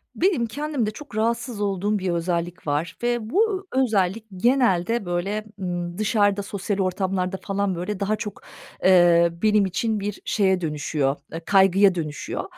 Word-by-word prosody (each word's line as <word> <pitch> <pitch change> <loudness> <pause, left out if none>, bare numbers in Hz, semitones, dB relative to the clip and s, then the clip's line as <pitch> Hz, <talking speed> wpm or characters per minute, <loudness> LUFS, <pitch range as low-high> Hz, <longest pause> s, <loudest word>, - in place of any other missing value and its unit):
Benim 345 -11 +2
kendimde 275 -2 -2
çok 280 +1 -11
rahatsız 230 0 -1
olduğum 200 +1 0
bir 185 -1 -2
özellik 170 -1 -2
var 150 +4 -1
ve 240 -2 -1
bu 395 - +1
ö 265 - +3
özellik 215 -2 0
genelde, 230 -2 +2
böyle, 195 +5 -2
ımm, 175 -2 -4
dışarıda, 205 -1 +2
sosyal 200 +1 -3
ortamlarda 185 0 -1
falan, 200 -2 -1
böyle, 185 +3 -4
daha 200 +2 0
çok, 210 -2 -7 0.4
eee, 175 -2 +6
benim 210 -2 +4
için 215 +3 -1
bir 205 +1 -4
şeye 190 -3 +2
dönüşüyor, 150 -3 -1 0.2
ııı, 165 - -5
kaygıya 195 0 +5
dönüşüyor. 155 -4 -4
195 Hz, 150 wpm, -23 LUFS, 180-220 Hz, 0.4 s, eee